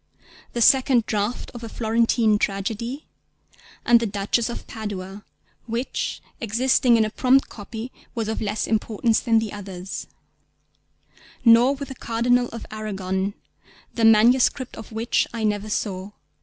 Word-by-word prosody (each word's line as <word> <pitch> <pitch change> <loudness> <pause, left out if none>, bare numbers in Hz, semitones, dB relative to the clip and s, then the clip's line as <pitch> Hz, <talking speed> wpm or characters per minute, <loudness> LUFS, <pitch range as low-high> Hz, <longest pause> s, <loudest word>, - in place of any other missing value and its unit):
_, - - -31
the 235 - +2
second 255 -3 +5
draft 210 +3 -2
of 240 -1 -9
A 230 - -6
Florentine 225 -1 +2
Tragedy, 225 +8 -3 0.8
and 240 -1 +6
The 230 - -1
Duchess 205 +4 0
of 235 - -6
Padua 205 -2 -6 0.4
(which, 235 +3 -3 0.2
existing 240 +2 +3
in 220 - +3
a 215 - -4
prompt 265 +3 +3
copy, 225 +4 -8 0.2
was 225 -2 -2
of 220 - -3
less 210 0 -1
importance 220 0 +1
than 230 -2 +2
the 220 -2 -1
others); 190 -2 -7 1.4
nor 235 +4 +6
with 280 0 -7
The - - -5
Cardinal 245 0 +1
of 230 -1 -8
Arragon, 195 -2 -3 0.6
the 230 - -2
manuscript 235 +4 +4
of 225 - -10
which 225 +2 0
I 225 - -3
never 210 0 -1
saw. 195 -2 -3
225 Hz, 140 wpm, -23 LUFS, 210-240 Hz, 1.4 s, and